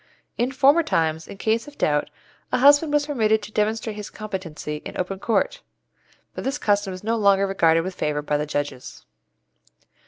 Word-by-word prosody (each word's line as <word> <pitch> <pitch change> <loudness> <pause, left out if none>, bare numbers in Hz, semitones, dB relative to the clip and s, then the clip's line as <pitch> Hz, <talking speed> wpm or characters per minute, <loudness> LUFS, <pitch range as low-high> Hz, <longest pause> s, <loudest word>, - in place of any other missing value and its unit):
In 245 +2 0
former 280 +4 +5
times 160 - -1
in - - -10
case 225 +4 0
of 290 - -13
doubt 150 -1 +1 0.4
a - - +2
husband 285 +4 +5
was 295 0 +2
permitted 220 -7 +1
to - - -9
demonstrate 215 +1 -1
his 210 -1 -7
competency 185 -8 -6
in - - -9
open 185 +1 -3
court, 225 - 0 0.7
but - - -6
this 270 +2 -1
custom 205 -6 +1
is 185 +1 -8
no 225 +2 0
longer 200 -2 +3
regarded 165 -4 +3
with 185 +3 -5
favour 150 -3 -2
by 150 0 0
the 150 +1 -3
judges. 145 -3 -5
205 Hz, 180 wpm, -23 LUFS, 165-230 Hz, 0.7 s, former